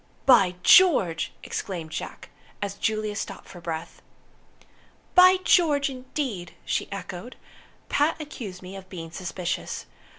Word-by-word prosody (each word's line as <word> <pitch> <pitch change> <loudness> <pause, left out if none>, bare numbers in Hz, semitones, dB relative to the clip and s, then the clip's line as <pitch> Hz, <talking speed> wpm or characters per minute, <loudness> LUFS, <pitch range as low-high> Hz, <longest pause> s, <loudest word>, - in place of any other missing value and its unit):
"By 195 -9 +6
George!" 225 - +5
exclaimed 170 -5 -5
Jack, 160 - -6 0.3
as 200 -1 -3
Juliet 215 0 -1
stopped 195 - -6
for 175 - -11
breath. 165 0 -6 1.1
"By 365 +1 +8
George, 290 -7 +3
indeed!" 255 - -5
she - - -2
echoed. 200 +3 -7 0.5
"Pat 295 +3 +1
accused 225 -12 -7
me 185 +2 -8
of 190 -1 -10
being 165 -3 -7
suspicious. 175 0 -4
200 Hz, 120 wpm, -26 LUFS, 180-275 Hz, 1.1 s, By